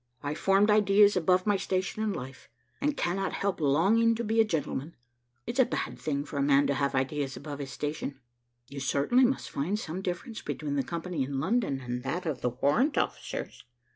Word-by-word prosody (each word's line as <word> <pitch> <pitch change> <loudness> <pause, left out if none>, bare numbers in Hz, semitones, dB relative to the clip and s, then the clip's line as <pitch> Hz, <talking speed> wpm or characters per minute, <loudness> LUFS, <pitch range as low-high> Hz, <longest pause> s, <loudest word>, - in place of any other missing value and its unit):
I 145 +1 -2
formed 195 +6 +3
ideas 205 0 +5
above 180 +1 +2
my 205 -2 +3
station 190 +2 -2
in 215 -1 0
life, 130 -6 -8 0.3
and 295 +1 0
cannot 195 +3 -1
help 200 -4 -1
longing 200 +11 +4
to 235 - -3
be 225 +1 +3
a - - +6
gentleman. 160 -5 -3 0.5
It's 235 +3 -4
a - - +8
bad - - -3
thing 145 -1 -2
for 145 - -6
a - - +2
man 140 0 +4
to 140 - +1
have 140 0 0
ideas 135 +1 -1
above 145 -2 -7
his 140 -1 -5
station." 145 0 -4 0.5
"You 140 - -7
certainly 145 - +3
must 265 +2 -1
find 175 +9 -1
some 185 -3 -5
difference 190 +5 -4
between 145 -2 -3
the 140 - +2
company 170 +1 -4
in 135 +1 -2
London 170 - 0
and 125 0 -4
that 155 +8 -3
of 155 -4 -3
the 125 - +1
warrant 145 - +1
officers." - - -3
165 Hz, 200 wpm, -29 LUFS, 140-205 Hz, 0.5 s, a